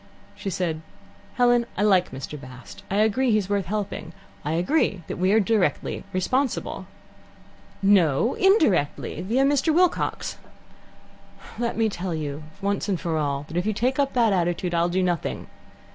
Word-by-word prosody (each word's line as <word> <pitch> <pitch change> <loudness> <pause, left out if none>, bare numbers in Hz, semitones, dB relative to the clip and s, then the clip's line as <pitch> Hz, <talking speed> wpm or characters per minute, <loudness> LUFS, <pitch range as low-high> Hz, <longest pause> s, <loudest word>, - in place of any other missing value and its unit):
She 195 - -5
said: 170 -3 -2 0.5
"Helen, 245 -1 +3
I 205 - +1
like 190 -4 +4
Mr. 135 +2 -7
Bast. 125 -7 -11
I 195 - -1
agree 220 +5 +2
that 235 - +3
he's 205 -3 +1
worth 200 -4 0
helping. 200 -4 -4 0.3
I 150 +1 -2
agree 180 - +1
that - - -5
we 185 +2 +2
are 220 - +5
directly 210 -2 0
responsible." 255 +9 -1 1.0
"No, 195 - +4
indirectly. 230 - +2
Via 230 +9 +1
Mr. 285 +3 +2
Wilcox." 355 +2 +1 1.2
"Let 235 -2 -1
me 225 -1 +3
tell 185 -4 -3
you 150 -1 -4 0.2
once 200 +1 -1
for 170 -3 -2
all 140 -1 -2
that 160 - -5
if 180 +4 0
you 215 - +1
take 255 +6 0
up 275 -1 +1
that 230 -5 +3
attitude, 175 0 0
I'll 170 +1 +2
do 185 +2 +1
nothing. 175 -3 -2
195 Hz, 160 wpm, -24 LUFS, 170-235 Hz, 1.2 s, are